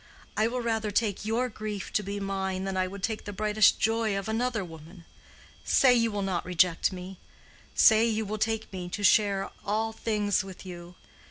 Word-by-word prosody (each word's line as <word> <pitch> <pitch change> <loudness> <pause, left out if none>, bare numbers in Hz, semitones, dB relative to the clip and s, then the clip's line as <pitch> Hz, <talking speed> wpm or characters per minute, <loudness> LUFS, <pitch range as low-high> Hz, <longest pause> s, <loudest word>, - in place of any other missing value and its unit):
I 215 - +2
will 250 +2 -2
rather 225 -2 -1
take 205 -1 0
your 230 +4 0
grief 215 -3 -6
to - - +2
be 200 0 -4
mine 190 -1 -2
than 195 0 -3
I 185 0 +1
would 195 0 -9
take 220 +1 -2
the 205 - -5
brightest 210 +1 +3
joy 225 -2 +1
of 195 - -4
another 225 -2 -1
woman. 165 +1 -13 0.6
Say 255 -2 +5
you 230 -1 +3
will 205 -2 -3
not 190 -3 -1
reject 180 0 +2
me—say 190 +4 0
you 220 -1 -1
will 215 +1 -4
take 220 -1 -1
me 180 -1 -5
to 205 +3 -5
share 200 -1 +3
all 220 +2 -1
things 210 -3 0
with 190 -1 -11
you. 175 -1 -9
205 Hz, 185 wpm, -28 LUFS, 190-220 Hz, 0.6 s, Say